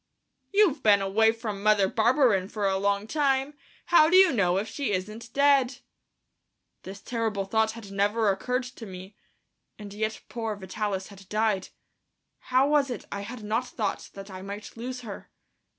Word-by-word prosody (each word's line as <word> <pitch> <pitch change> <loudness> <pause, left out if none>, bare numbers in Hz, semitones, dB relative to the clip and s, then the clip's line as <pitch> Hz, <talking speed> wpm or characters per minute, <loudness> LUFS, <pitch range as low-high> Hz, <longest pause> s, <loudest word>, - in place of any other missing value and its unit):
"You've 395 -9 +3
been 205 -3 +5
away 210 +3 +3
from 220 -3 -5
Mother 210 -2 +4
Barberin 225 -3 +3
for 210 -2 -3
a 190 0 +1
long 200 +1 0
time; 275 +1 0 0.3
how 315 -3 +6
do 360 - +3
you 375 -5 +7
know 180 -5 +2
if 205 +3 -1
she 275 -3 -3
isn't 215 +5 -5
dead?" 275 -2 +3 1.0
This 195 +1 -9
terrible 225 -5 -2
thought 220 +2 +1
had 220 -3 -10
never 205 +2 +2
occurred 250 +6 -1
to 250 -3 -10
me, 190 +2 -10 0.6
and 205 -1 -9
yet 215 +1 -3
poor 225 -2 -4
Vitalis 195 0 -4
had 195 -2 -15
died,... 215 -3 0 0.8
how 255 +2 +4
was 290 -2 +2
it 245 - -5
I 200 - -4
had 225 +2 -8
not 225 +4 -1
thought 215 - -3
that 195 0 -9
I 185 0 -8
might 200 +2 -8
lose 250 +2 -6
her.... 210 -5 -9
215 Hz, 165 wpm, -27 LUFS, 200-250 Hz, 1.0 s, you